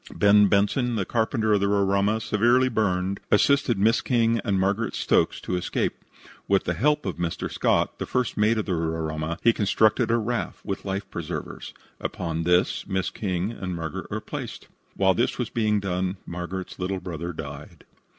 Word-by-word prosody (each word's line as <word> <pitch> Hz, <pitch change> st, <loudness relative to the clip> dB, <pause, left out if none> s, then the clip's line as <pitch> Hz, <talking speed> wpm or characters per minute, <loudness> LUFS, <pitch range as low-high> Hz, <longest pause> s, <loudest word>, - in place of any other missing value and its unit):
Ben 105 Hz, 0 st, +6 dB
Benson, 110 Hz, +5 st, +2 dB
the 100 Hz, -4 st, -1 dB
carpenter 110 Hz, -1 st, +1 dB
of 105 Hz, -, +4 dB
the 100 Hz, -, +1 dB
Roraima, 100 Hz, +1 st, +2 dB
severely 120 Hz, +4 st, +3 dB
burned, 95 Hz, -4 st, 0 dB
assisted 140 Hz, +1 st, +3 dB
Miss 110 Hz, +4 st, +3 dB
King 115 Hz, -2 st, +2 dB
and 100 Hz, -3 st, +1 dB
Margaret 100 Hz, +4 st, 0 dB
Stokes -, -, +2 dB
to 90 Hz, -, -2 dB
escape. 90 Hz, -, -2 dB, 0.4 s
With 100 Hz, -1 st, +3 dB
the -, -, -1 dB
help 150 Hz, +2 st, +1 dB
of -, -, -3 dB
Mr. 85 Hz, -1 st, -3 dB
Scott, -, -, +1 dB
the -, -, -3 dB
first 125 Hz, -3 st, -1 dB
mate 105 Hz, +2 st, +2 dB
of 110 Hz, -, -1 dB
the 95 Hz, -, -1 dB
Roraima, 80 Hz, -1 st, -2 dB
he 115 Hz, -, +5 dB
constructed 110 Hz, +1 st, +2 dB
a 115 Hz, -, +3 dB
raft, 120 Hz, +1 st, -3 dB
with 100 Hz, -1 st, -4 dB
life 100 Hz, 0 st, -3 dB
preservers. -, -, -6 dB, 0.2 s
Upon 85 Hz, -2 st, -3 dB
this 90 Hz, +1 st, +2 dB
Miss 95 Hz, -1 st, -1 dB
King 95 Hz, 0 st, -2 dB
and 95 Hz, -5 st, -5 dB
Margaret 80 Hz, -2 st, -5 dB
were -, -, -3 dB
placed. -, -, -7 dB, 0.3 s
While -, -, +3 dB
this -, -, 0 dB
was -, -, -3 dB
being 105 Hz, -2 st, +1 dB
done 95 Hz, 0 st, -2 dB
Margaret's 90 Hz, +2 st, -6 dB
little 95 Hz, +1 st, -2 dB
brother 85 Hz, -1 st, -5 dB
died. 75 Hz, +2 st, -9 dB
100 Hz, 175 wpm, -25 LUFS, 90-110 Hz, 0.4 s, Ben